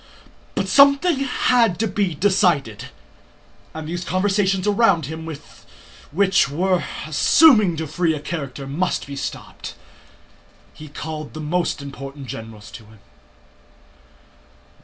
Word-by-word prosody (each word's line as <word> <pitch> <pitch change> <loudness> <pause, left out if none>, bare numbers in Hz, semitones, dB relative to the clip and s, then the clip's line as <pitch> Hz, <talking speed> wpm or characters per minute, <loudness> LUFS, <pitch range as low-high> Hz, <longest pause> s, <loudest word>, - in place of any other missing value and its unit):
But - - -1
something 280 +3 +5
had 245 -6 +2
to 225 - 0
be 195 -4 -1
decided, 175 - +1 0.9
and 160 -1 -7
these 175 +2 -4
conversations 195 0 0
around 205 - +3
him 160 +3 -7 0.8
which 190 -2 +3
were 180 +5 0 0.2
assuming 205 - +5
too 160 - -3
free 160 +1 0
a - - -5
character 140 -3 -6
must 155 +7 -2
be 140 - -8
stopped. - - -7 1.0
He 155 - -11
called 155 +1 -7
the - - -6
most 155 -1 -2
important 140 0 -8
generals 110 -3 -9
to 115 - -11
him. 110 0 -18
165 Hz, 115 wpm, -21 LUFS, 145-195 Hz, 1.0 s, something